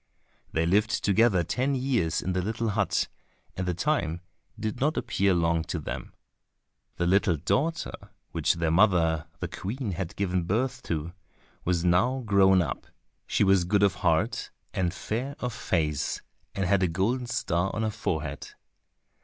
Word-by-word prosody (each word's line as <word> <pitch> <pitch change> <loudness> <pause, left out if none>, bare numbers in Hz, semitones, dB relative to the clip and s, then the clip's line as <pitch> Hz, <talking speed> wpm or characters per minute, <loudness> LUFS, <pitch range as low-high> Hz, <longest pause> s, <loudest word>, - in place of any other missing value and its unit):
They 80 0 +1
lived 105 +5 +2
together 100 -3 +4
ten 130 - 0
years 125 - 0
in 95 - -1
the 90 - 0
little 110 +4 -1
hut, 100 - +1 0.5
and 95 0 -3
the 90 - 0
time 90 - 0 0.4
did 110 +2 -3
not 150 +4 +1
appear 100 0 +1
long 85 -1 +2
to - - -3
them. - - -6 0.8
The 85 - -1
little 90 -2 +3
daughter 130 - 0 0.4
which - - +1
their 80 -1 0
mother 80 -4 +3
the - - -1
Queen 115 +2 -4
had 90 -1 -4
given 90 -3 0
birth 115 +9 0
to, 80 +1 -2 0.5
was 90 -1 +1
now 120 +10 +2
grown 95 -3 +5
up; 70 - -5 0.4
she - - +2
was 95 -2 +4
good 100 +3 +2
of 100 - +4
heart, - - +1 0.2
and 90 -2 0
fair 130 +10 -3
of 125 -1 -3
face, 75 -9 -1 0.3
and 95 - 0
had 95 +1 +3
a 90 - +3
golden 110 +9 0
star 90 -5 0
on 110 - -1
her 110 - 0
forehead. 75 -8 -4
95 Hz, 160 wpm, -27 LUFS, 85-110 Hz, 0.8 s, grown